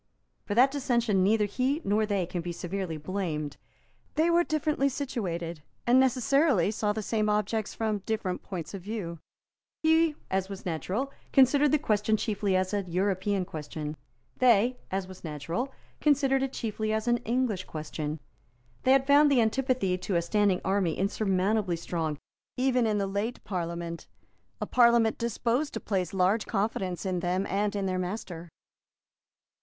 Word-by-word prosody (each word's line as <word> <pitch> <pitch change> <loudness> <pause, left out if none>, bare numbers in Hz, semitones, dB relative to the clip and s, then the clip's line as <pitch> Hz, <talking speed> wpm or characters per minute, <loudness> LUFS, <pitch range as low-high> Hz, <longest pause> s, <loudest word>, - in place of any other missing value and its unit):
For 205 - -2
that 260 +4 +6
dissension 240 -8 +1
neither 210 +3 +3
he 255 +8 0
nor 210 +2 +1
they 200 -4 0
can 175 0 -4
be 175 +1 -4
severely 175 -1 -4
blamed. 155 -3 -3 0.6
They 325 +2 +3
were 345 +1 +4
differently 305 -3 +1
situated, 175 - -4 0.2
and 245 +2 +5
necessarily 260 - +3
saw 210 -1 0
the 215 +1 -3
same 215 0 0
objects 210 +1 -1
from 215 -2 -1
different 200 -3 -2
points 180 -3 -6
of 195 - -6
view. 180 -5 -5 0.6
He, 320 -1 +4 0.2
as 190 0 0
was 195 -1 -8
natural, 190 - -2 0.2
considered 275 +2 +5
the 305 - +5
question 215 -5 +1
chiefly 205 -3 0
as 185 +1 0
an 200 -3 -2
European 190 +1 0
question. 150 -1 -6 0.4
They, 245 0 +4
as 190 0 -2
was 185 -1 -12
natural, 165 - -3 0.3
considered 275 -2 +3
it 270 -1 -1
chiefly 215 -1 -2
as 220 +1 -1
an 240 0 +4
English 235 -4 -1
question. 155 0 -5 0.6
They 260 - +4
had 270 0 +4
found 290 +1 +6
the 265 - +4
antipathy 230 -5 +1
to 185 +1 -2
a 170 - +2
standing 200 0 +2
army 190 -4 +1
insurmountably 195 -1 +1
strong 165 -2 -3 0.4
even 250 -2 +2
in 210 -1 +1
the 200 - 0
late 200 +5 -3
Parliament, 170 -2 -4 0.5
a - - -2
Parliament 235 -2 +4
disposed 235 +5 -1
to - - -2
place 185 -5 -1
large 195 +3 +1
confidence 195 -3 -2
in 185 -2 0
them 180 +2 0
and 205 +1 -1
in 200 -1 -1
their 185 -1 -1
master. 180 -3 -5
205 Hz, 160 wpm, -28 LUFS, 185-245 Hz, 0.6 s, that